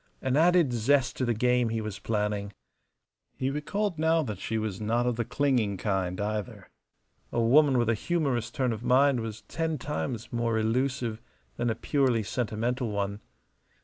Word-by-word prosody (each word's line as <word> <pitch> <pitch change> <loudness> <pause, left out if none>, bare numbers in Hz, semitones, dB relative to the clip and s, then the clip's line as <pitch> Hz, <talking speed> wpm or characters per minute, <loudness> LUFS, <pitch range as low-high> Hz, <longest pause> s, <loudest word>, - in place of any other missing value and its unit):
An 130 0 0
added 170 -3 +4
zest 130 +3 +2
to 130 - 0
the 120 - +1
game 125 +1 +2
he 115 0 -1
was 110 -2 -5
planning. 105 -2 -2 0.8
He 130 +1 -1
recalled 175 +5 -2
now 160 0 +3
that 105 -8 -5
she 110 - -2
was 110 -2 -3
not 115 +3 +1
of 125 -1 +1
the 120 - -1
clinging 120 -6 +1
kind 95 -3 -1
either. 105 -1 -4 0.6
A - - 0
woman 135 +4 +5
with 120 -2 +2
a 115 - +3
humorous 130 -3 -1
turn 125 -1 0
of 110 - -6
mind 130 +1 +4
was 110 -1 -5
ten 160 -1 -2
times 120 -5 -4
more 115 -1 0
elusive 115 0 0 0.4
than 120 0 0
a 110 - 0
purely 125 -2 +1
sentimental 120 +3 -2
one. 100 0 -2
120 Hz, 170 wpm, -28 LUFS, 110-135 Hz, 0.8 s, woman